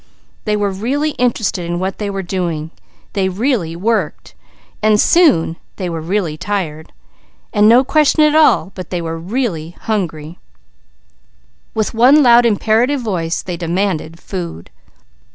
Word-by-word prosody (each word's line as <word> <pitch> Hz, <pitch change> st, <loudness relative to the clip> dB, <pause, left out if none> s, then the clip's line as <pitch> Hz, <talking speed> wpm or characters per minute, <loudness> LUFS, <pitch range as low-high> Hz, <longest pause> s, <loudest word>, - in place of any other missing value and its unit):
They 210 Hz, -1 st, +1 dB
were 205 Hz, -1 st, 0 dB
really 270 Hz, +10 st, -1 dB
interested 225 Hz, -7 st, 0 dB
in 170 Hz, 0 st, -3 dB
what 190 Hz, +2 st, -3 dB
they 205 Hz, -1 st, -2 dB
were 195 Hz, -1 st, -4 dB
doing, 170 Hz, -4 st, -3 dB, 0.4 s
they 190 Hz, -2 st, 0 dB
really 195 Hz, -, -1 dB
worked, 200 Hz, -2 st, -2 dB, 0.5 s
also 215 Hz, 0 st, +4 dB
soon 210 Hz, -, +3 dB, 0.2 s
they 180 Hz, -3 st, -4 dB
were 165 Hz, -1 st, -4 dB
really 170 Hz, -2 st, -2 dB
tired, 160 Hz, -6 st, -4 dB, 0.6 s
they 210 Hz, -2 st, +3 dB, 1.4 s
were 165 Hz, 0 st, -4 dB
really 180 Hz, -4 st, -3 dB
hungry. 170 Hz, -7 st, -3 dB, 1.4 s
With 215 Hz, -1 st, -1 dB
imperative 240 Hz, 0 st, +4 dB
voice 175 Hz, -7 st, -2 dB
they 180 Hz, -2 st, -5 dB
demanded 170 Hz, -2 st, -2 dB
food. 175 Hz, -, -7 dB
195 Hz, 110 wpm, -17 LUFS, 165-225 Hz, 1.4 s, also